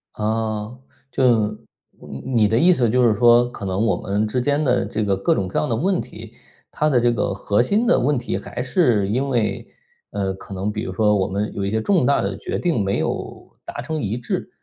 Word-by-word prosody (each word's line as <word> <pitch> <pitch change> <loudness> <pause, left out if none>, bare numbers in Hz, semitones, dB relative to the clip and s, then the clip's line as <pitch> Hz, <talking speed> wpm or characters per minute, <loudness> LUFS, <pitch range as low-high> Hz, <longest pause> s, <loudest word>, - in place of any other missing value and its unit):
哦， 110 +1 -2 0.3
就 115 -5 +3 0.5
你 70 - -9
你 110 -3 +4
的 110 - +1
意 180 +1 +5
思 120 -7 +1
就 125 +2 +3
是 110 - +2
说， 120 +2 +5
可 105 - -8
能 95 +2 -1
我 - - +2
们 100 +2 -1
之 125 +4 -1
间 145 +4 +1
的 125 -3 +1
这 110 - -2
个 100 -1 +1
各 95 - +1
种 95 -2 -1
各 - - -4
样 150 - 0
的 115 - +1
问 185 - 0
题， 110 +1 -11 0.4
它 150 - 0
的 125 -4 +3
这 120 0 +2
个 105 -3 -1
核 100 +3 +1
心 210 - +1
的 - - +4
问 145 +2 +1
题 - - -3
还 - - -6
是 125 - +2
因 130 +7 -1
为， 120 -5 -1 0.5
呃， 95 -1 -2
可 95 +1 -11
能 95 +2 -2
比 105 0 -4
如 - - -4
说 105 +2 +2
我 95 - 0
们 100 +2 -2
有 100 - -2
一 - - -1
些 110 +2 0
重 175 - +2
大 140 - +3
的 100 0 -2
决 - - -4
定 165 - 0
没 100 0 0
有 - - -5
达 - - -6
成 155 -1 -4
一 105 +2 -2
致。 120 - -4
110 Hz, 250 characters per minute, -21 LUFS, 100-125 Hz, 0.5 s, 意